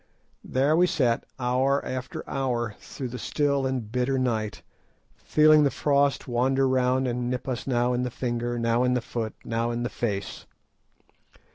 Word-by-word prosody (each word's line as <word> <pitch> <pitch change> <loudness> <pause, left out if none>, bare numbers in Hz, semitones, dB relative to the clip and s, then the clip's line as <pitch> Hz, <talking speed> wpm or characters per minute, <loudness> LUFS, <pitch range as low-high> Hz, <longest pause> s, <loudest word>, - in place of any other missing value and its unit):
There 140 +4 +2
we 180 +2 +4
sat 125 -9 +1
hour 130 +3 +1
after 130 0 -5
hour 120 -5 -1
through 130 -2 -7
the 125 +1 -6
still 140 -2 0
and 125 -5 -3
bitter 125 +2 0
night, 115 -5 -1 0.5
feeling 155 0 +5
the 140 - +4
frost 140 +1 +1
wander 130 +2 +2
round 130 0 +2
and 120 0 -2
nip 125 +1 -3
us 125 -1 -3
now 125 -1 +1
in 125 - 0
the 125 - -1
finger, 120 0 -2
now 115 +1 +1
in 125 0 +2
the 125 - 0
foot, 115 -2 -4
now 115 0 -1
in 120 0 -2
the 120 - -1
face. 100 -5 -4
125 Hz, 165 wpm, -26 LUFS, 120-135 Hz, 0.5 s, feeling